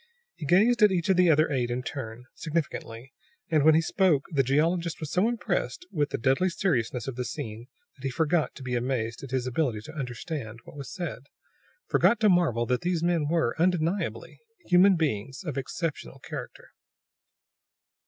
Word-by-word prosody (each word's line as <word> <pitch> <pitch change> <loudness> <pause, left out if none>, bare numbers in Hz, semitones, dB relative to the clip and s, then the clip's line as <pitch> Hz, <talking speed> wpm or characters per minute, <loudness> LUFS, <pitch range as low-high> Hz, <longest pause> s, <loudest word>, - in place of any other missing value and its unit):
He - - -7
gazed 220 +7 +4
at 210 -2 +7
each 175 -2 0
of 190 - +5
the 180 -1 +5
other 155 0 +4
eight 125 -3 0
in 125 +1 -2
turn, 125 -4 -6
significantly; 135 -6 -4 0.4
and 155 -3 +4
when 155 +1 +6
he 165 - +3
spoke 165 -5 +2
the 140 -4 +3
geologist 165 +6 +1
was 155 -2 -5
so 185 +5 +3
impressed 240 +8 -2
with 150 -4 0
the - - -2
deadly 135 +9 +2
seriousness 125 - -1
of 135 - -4
the 125 - -1
scene 115 0 -6 0.3
that 135 - -18
he 135 - 0
forgot 160 +4 0
to 135 - -10
be 125 -1 -4
amazed 120 -2 -1
at 135 - -8
his 130 -1 -1
ability 125 -4 -1
to 155 - -11
understand 125 -3 -5
what - - -13
was 140 -2 -7
said, 170 -7 -5 0.6
forgot 235 - +3
to 215 - +5
marvel 160 - +3
that 125 +1 0
these 175 -2 -1
men 170 -4 +1
were, 165 -7 +1
undeniably, 180 +1 0 0.3
human 185 +2 +6
beings 135 - -2
of 155 -7 -4
exceptional 140 - -4
character. - - -8
150 Hz, 180 wpm, -27 LUFS, 125-175 Hz, 0.6 s, at